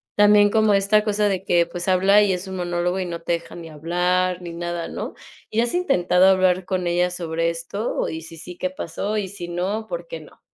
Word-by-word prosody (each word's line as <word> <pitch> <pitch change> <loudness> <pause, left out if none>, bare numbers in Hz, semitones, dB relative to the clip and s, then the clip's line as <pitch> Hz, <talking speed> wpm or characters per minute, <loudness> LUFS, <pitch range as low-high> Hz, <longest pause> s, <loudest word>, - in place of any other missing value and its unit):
también 205 0 +6
como 215 -1 +3
esta 205 +2 +3
cosa 210 0 +1
de 190 0 -2
que, 170 -3 +3
pues, 175 +2 -6
habla 190 +3 +5
y 200 -2 +2
es 180 +2 -4
un 190 - -5
monólogo 175 +1 -1
y 185 - -2
no 170 -1 -5
te 170 - -1
deja 170 - -5
ni 165 -1 -9
hablar 180 +3 0
ni 170 -1 -7
nada 175 0 -4
¿no? - - -5 0.4
Y 225 +2 +1
has 235 - -1
intentado 185 - +3
hablar 185 -1 +3
con 185 -2 -2
ella 175 +1 +1
sobre 165 -1 -1
esto 170 +6 -3
y 160 0 -5
sí, 165 0 -11
sí, 180 +2 -10
¿qué 185 - -2
pasó? 190 +4 -4
Y 195 -3 -2
si 180 -3 -7
no, 190 +6 -3
¿por - - -5
qué - - -6
no? - - -17
180 Hz, 230 wpm, -22 LUFS, 175-200 Hz, 0.4 s, también